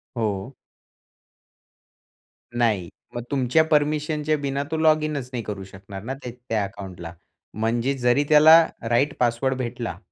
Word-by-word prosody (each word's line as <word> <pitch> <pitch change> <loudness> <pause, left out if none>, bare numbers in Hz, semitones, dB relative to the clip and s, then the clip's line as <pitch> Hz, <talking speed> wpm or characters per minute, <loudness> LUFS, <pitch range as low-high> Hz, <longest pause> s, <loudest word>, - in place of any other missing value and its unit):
हो. 110 +1 -2 2.0
नाही, 110 -7 +1 0.3
मग 120 - -4
तुमच्या 135 +3 +3
परमिशनच्या 150 +1 +1
बिना 140 -1 -2
तो 160 - -1
लॉगिनच 155 -4 +1
नाही 120 -2 -3
करू 100 -2 -6
शकणार 95 +1 -10
ना, 130 +3 -4
त्या 125 - -5 0.2
त्या 110 -2 +1
अकाउंटला, 95 -4 -8 0.4
म्हणजेच 120 +5 -1
जरी 125 +4 +3
त्याला 160 +2 +8 0.2
राइट 140 +5 +2
पासवर्ड 125 +2 +1
भेटला, 120 -2 -4
125 Hz, 125 wpm, -23 LUFS, 110-145 Hz, 2.0 s, त्याला